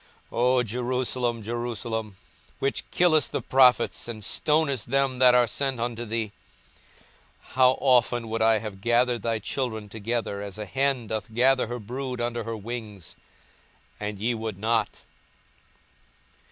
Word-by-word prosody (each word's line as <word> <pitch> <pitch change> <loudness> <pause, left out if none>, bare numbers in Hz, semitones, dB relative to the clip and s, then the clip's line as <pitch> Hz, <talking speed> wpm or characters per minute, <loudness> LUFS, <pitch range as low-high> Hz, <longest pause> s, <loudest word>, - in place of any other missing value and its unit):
42:013:034 - - -7
O 125 0 +4
Jerusalem, 125 0 -1
Jerusalem, 115 -2 -4 0.4
which 135 - -2
killest 160 -4 +3
the - - -2
prophets, 130 -3 +4
and 110 -3 -6
stonest 145 -2 0
them 135 -1 +1
that 125 -1 +7
are 125 -1 +5
sent 135 0 -2
unto 120 0 -3
thee; 110 -1 -2 1.2
how 130 0 +5
often 120 -3 +3
would 110 0 -2
I 110 0 +5
have 105 -3 -7
gathered 120 +1 +2
thy 115 -1 0
children 110 -1 -4
together, 110 -1 -3
as 100 0 -6
a 105 - -5
hen 135 +2 0
doth 110 +1 -4
gather 130 +2 +3
her 120 +1 -4
brood 125 +3 -5
under 120 -1 -2
her 115 -1 -4
wings, 105 -3 -7 0.8
and 105 0 -4
ye 115 +5 0
would 110 -3 -4
not! 110 +1 0
120 Hz, 140 wpm, -26 LUFS, 110-125 Hz, 1.2 s, that